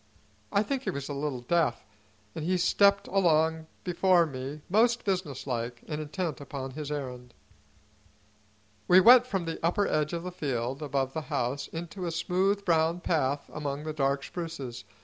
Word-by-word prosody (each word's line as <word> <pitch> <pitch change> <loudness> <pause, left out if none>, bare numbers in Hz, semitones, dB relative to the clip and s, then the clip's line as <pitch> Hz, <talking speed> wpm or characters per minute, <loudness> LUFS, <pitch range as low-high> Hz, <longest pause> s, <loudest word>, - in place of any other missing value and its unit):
I 200 - +3
think 270 +3 -2
he - - -3
was 140 0 -4
a - - -3
little 140 -3 -3
deaf, 150 -1 +1 0.5
and 160 - -5
he 180 +3 +1
stepped 200 +3 +4
along 160 -4 +2 0.2
before 180 -1 +3
me 140 +1 -6
most 235 +5 +3
businesslike 130 - -3
and 150 -1 -3
intent 155 0 -3
upon 135 -1 -6
his 150 +1 -6
errand. 125 -4 -6 1.5
We 180 - +8
went 245 +5 +8
from 195 -7 -2
the 165 -1 -5
upper 190 +5 +2
edge 150 -1 0
of 170 0 -3
the 180 - -5
field 135 -4 -3
above 135 -2 -1
the 160 - -2
house 135 -1 -1
into 175 +2 -6
a - - -2
smooth, 190 +4 0
brown 165 0 +2
path 145 -4 0
among 145 -1 -4
the 155 0 -4
dark 140 -1 0
spruces. 140 -9 -6
155 Hz, 165 wpm, -29 LUFS, 140-180 Hz, 1.5 s, We